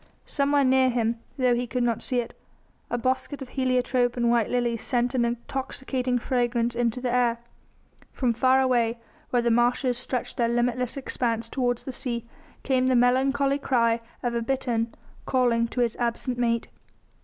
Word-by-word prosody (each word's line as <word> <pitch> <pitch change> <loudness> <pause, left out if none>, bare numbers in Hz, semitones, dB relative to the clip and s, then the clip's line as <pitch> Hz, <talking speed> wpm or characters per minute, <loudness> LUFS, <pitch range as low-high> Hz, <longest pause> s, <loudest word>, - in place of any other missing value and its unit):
Somewhere 285 0 +2
near 260 0 +4
him, 235 -1 0 0.2
though 250 -2 +3
he 245 +1 -1
could 250 +1 -1
not 235 -2 0
see 250 -1 0
it, 235 - -10 0.5
a 240 - -1
bosquet 260 +4 -1
of 255 - -12
heliotrope 255 -2 +1
and 235 -1 +2
white 235 -3 +2
lilies 240 -2 0
sent 245 -1 0
an 250 -2 +2
intoxicating 250 +1 -2
fragrance 240 -1 0
into 235 0 0
the 250 -1 -2
air. 240 -2 +2 0.7
From 245 -3 0
far 260 +3 +3
away 240 -3 +2 0.3
where 245 -1 +1
the 235 - +2
marshes 245 +1 +2
stretched 255 -1 -3
their 235 -1 +2
limitless 240 +1 0
expanse 230 -4 -2
toward 245 -2 0
the 265 - -7
sea 240 -2 -2 0.4
came 260 -1 +2
the 260 - +3
melancholy 270 +3 +2
cry 235 -4 +2 0.2
of 240 -1 -1
a 235 - 0
bittern, 235 -2 -1 0.4
calling 240 -3 +2
to 245 - -2
his 235 -2 +1
absent 240 +1 -1
mate. 235 -1 +1
245 Hz, 165 wpm, -26 LUFS, 235-255 Hz, 0.7 s, near